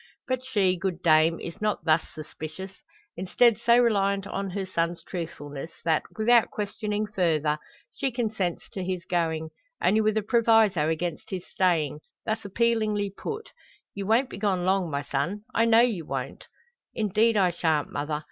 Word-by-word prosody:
But 255 -1 -1
she, 195 -8 +1
good 175 -1 -3
dame, 160 0 +4
is 170 +5 -8
not 210 -6 -1
thus 160 0 +4
suspicious, 155 +4 -7 0.4
instead 210 +5 +3
so 235 0 +6
reliant 200 -5 +2
on 195 0 -3
her 190 +1 -3
son's 170 -2 -2
truthfulness, 160 -4 -6 0.2
that, 160 -2 +3 0.2
without 230 +1 +4
questioning 210 0 -3
further, 160 -7 0 0.3
she 270 -2 -1
consents 220 -7 -2
to 190 - -4
his 180 -1 -3
going, 160 -3 -1 0.3
only 215 +2 +3
with 215 0 +1
a 215 - +1
proviso 220 - +3
against 165 +1 -3
his 185 -2 -5
staying, 160 -6 +1 0.3
thus 220 +1 -2
appealingly 215 -1 +1
put 445 - -6 0.4
"Ye 200 - -5
won't 230 +7 +2
be - - -7
gone 190 -4 0
long, 190 -2 +2
my 140 -1 -2
son! 145 +10 -2
I 230 - +3
know 230 0 +6
ye 230 -8 +1
won't!" 155 - -5 0.5
"Indeed 220 +1 +2
I 185 -3 +4
shan't, 160 -3 0
mother. 150 +1 -2
195 Hz, 160 wpm, -26 LUFS, 165-220 Hz, 0.5 s, so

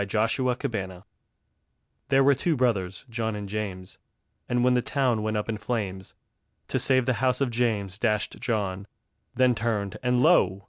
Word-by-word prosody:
_ - - +1
The 115 +6 0
Twins 95 -6 -5 1.1
There 135 0 +4
were 140 +1 +6
two 160 +4 0
brothers, 100 -7 0
John 115 -2 -2
and 100 -1 -5
James, 95 -3 -5 0.5
And 120 0 +1
when 125 0 +4
the 125 - +3
town 125 -4 0
went 110 0 -1
up 105 - -2
in 110 -2 -3
flames, 100 -4 -4 0.5
To - - 0
save 130 -2 +2
the 125 -1 0
house 125 -1 +2
of 135 -3 0
James 110 -5 -1
dashed 105 -3 0
John, 100 -4 -2 0.5
Then 130 -1 +4
turned, 110 -3 -2
and 125 0 +2
lo! 100 - +4
115 Hz, 170 wpm, -26 LUFS, 100-125 Hz, 1.1 s, were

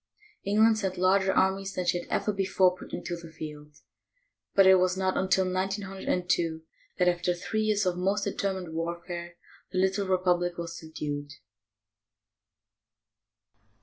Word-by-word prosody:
England 215 +2 +4
sent 190 -3 -2
larger 190 +1 +3
armies 195 +1 +1
than 180 - -2
she 175 0 +2
had - - -10
ever 210 - 0
before 190 -2 +2
put - - -12
into 175 - -4
the 170 -1 -11
field, 150 -2 -9 0.7
but 195 - +7
it 190 0 +8
was 185 0 +1
not 190 0 0
until 190 0 +2
1902 185 -3 -1 0.3
that, 180 - +3
after 175 0 +1
three 215 +5 -2
years 215 -2 +1
of 180 -1 0
most 195 +3 +1
determined 190 -4 -2
warfare, 170 +1 -5 0.4
the 185 - -3
little 190 +1 +1
republic 180 -2 +1
was 170 0 -5
subdued. 145 -2 -5
185 Hz, 140 wpm, -28 LUFS, 175-195 Hz, 0.7 s, it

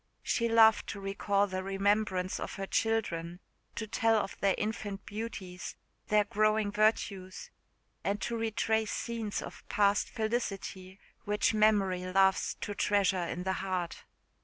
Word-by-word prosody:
She 235 -1 +1
loved 225 -1 +6
to 200 - -5
recall 200 +1 +1
the 185 -1 -3
remembrance 195 -1 0
of - - -5
her 195 - -4
children 180 -6 -1 0.4
to 225 - -3
tell 225 +1 +2
of 210 -2 -1
their 195 -1 +2
infant 205 -2 -4
beauties, 200 -4 -6 0.3
their 210 0 +4
growing 215 0 +1
virtues 205 -3 0 0.5
and 200 +1 0
to 235 - -2
retrace 220 -1 0
scenes 230 -3 -3
of - - -10
past 200 -1 +2
felicity 200 -5 -3 0.3
which 210 +2 +1
memory 205 -4 +3
loves 190 +1 +3
to 205 - -3
treasure 195 -4 +2
in 175 +2 -4
the 190 0 0
heart. 185 -3 -3
205 Hz, 135 wpm, -31 LUFS, 190-220 Hz, 0.5 s, loved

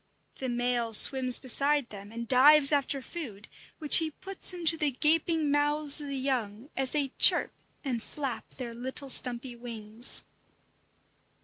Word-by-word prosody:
The 260 - -5
male 240 -1 -3
swims 255 +2 +5
beside 280 +1 -1
them 200 0 -12
and 235 +1 -8
dives 280 +3 +5
after 280 -2 -2
food, 235 - -9 0.3
which 300 -3 +5
he 320 -1 0
puts 385 +6 -1
into 340 -2 +2
the 305 -2 0
gaping 310 +2 0
mouths 295 +1 +2
of 290 - -8
the 275 -1 -6
young 255 -2 -5
as 265 -1 -2
they 285 -1 -2
chirp - - +5 0.3
and 245 -4 -4
flap 270 0 -7
their 245 -3 -8
little 260 +3 -7
stumpy 245 0 -1
wings. 230 -1 -4
270 Hz, 145 wpm, -27 LUFS, 240-295 Hz, 0.3 s, swims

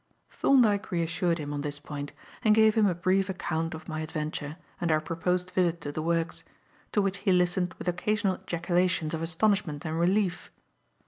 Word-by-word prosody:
Thorndyke 220 -7 +3
reassured 170 0 0
him 145 -2 -5
on 145 - -2
this 145 0 -4
point 145 -1 -6 0.3
and 215 -2 +5
gave 220 0 +6
him 215 -2 +4
a 180 - +1
brief 185 +2 +1
account 165 -3 -2
of 160 - -11
my 155 -2 -4
adventure 155 -1 -4 0.2
and 170 -2 0
our 155 - +4
proposed 180 +3 -1
visit 175 -2 +1
to 145 - -4
the 155 - -3
works; 165 0 -1 0.5
to 205 - +2
which 195 0 -1
he 195 - +1
listened 180 0 +2
with - - -9
occasional 195 +2 0
ejaculations 175 -1 0
of 160 - -2
astonishment 165 -2 +1
and 160 +1 -2
relief. 185 +1 +1
175 Hz, 180 wpm, -28 LUFS, 160-190 Hz, 0.5 s, gave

